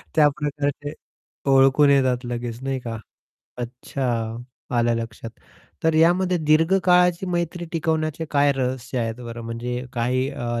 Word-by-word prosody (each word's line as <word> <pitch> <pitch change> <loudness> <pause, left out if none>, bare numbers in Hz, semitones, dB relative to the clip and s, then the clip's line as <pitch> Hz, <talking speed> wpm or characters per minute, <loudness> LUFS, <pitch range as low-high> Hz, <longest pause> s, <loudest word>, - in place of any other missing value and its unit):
त्याप्रकारचे, 145 -1 +1 0.6
ओळखून 135 +2 +5
येतात 130 -3 +2
लगेच. 120 -1 -4
नाही 135 -1 -1
का? 115 -2 -5 0.6
अच्छा! 120 -2 -3 0.4
आलं 120 0 +3
लक्षात. 115 0 -6 0.5
तर 160 - +3
यामध्ये 180 +3 +4
दीर्घकाळाची 180 +3 +3
मैत्री 175 0 -2
टिकवण्याचे 160 -1 -1
काय 145 0 +4
रहस्य 130 -1 -2
आहेत 115 -1 -1
बरं? 120 -1 -7
म्हणजे 120 +2 -4
काही 130 +2 0
अ, 120 -4 -3
135 Hz, 120 wpm, -23 LUFS, 120-155 Hz, 0.6 s, ओळखून